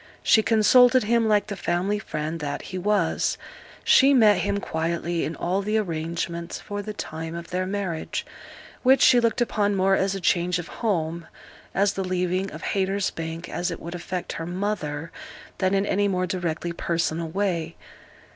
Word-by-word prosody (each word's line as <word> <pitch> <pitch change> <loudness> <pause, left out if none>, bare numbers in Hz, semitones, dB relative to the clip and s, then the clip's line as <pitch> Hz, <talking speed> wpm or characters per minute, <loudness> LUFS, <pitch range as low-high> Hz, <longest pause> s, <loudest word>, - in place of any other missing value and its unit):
She 220 - +5
consulted 245 +3 +5
him 230 +1 +2
like 210 -1 +3
the 205 - -5
family 190 +3 -1
friend 155 -3 -4
that 145 -2 -4
he 185 - -6
was: 190 -3 +1 0.5
she 275 +1 +6
met 215 -5 +6
him 200 0 0
quietly 170 0 -2
in 160 - -4
all 185 +3 -1
the 210 +2 0
arrangements 170 -2 -3
for 205 -1 -5
the 215 +1 -5
time 160 -4 -6
of 170 0 -8
their 185 +1 -1
marriage, 190 -5 -3 0.6
which 265 +1 +5
she 245 - +7
looked 230 0 +1
upon 205 -4 +1
more 190 0 +3
as 195 0 0
a - - -3
change 180 0 +1
of 175 - -6
home, 170 -6 -1 0.5
as 200 +1 +3
the 195 - -2
leaving 185 +1 -1
of - - -9
Haytersbank, 190 -4 -2
as 175 +1 -2
it 170 - -5
would 170 +1 -7
affect 175 +1 -4
her 165 - -5
mother, 175 -5 -3 0.5
than 185 0 +2
in 195 +1 +1
any 205 0 +1
more 185 -2 0
directly 175 -2 -3
personal 170 -1 -1
way. 170 -3 -1
185 Hz, 170 wpm, -25 LUFS, 170-205 Hz, 0.6 s, she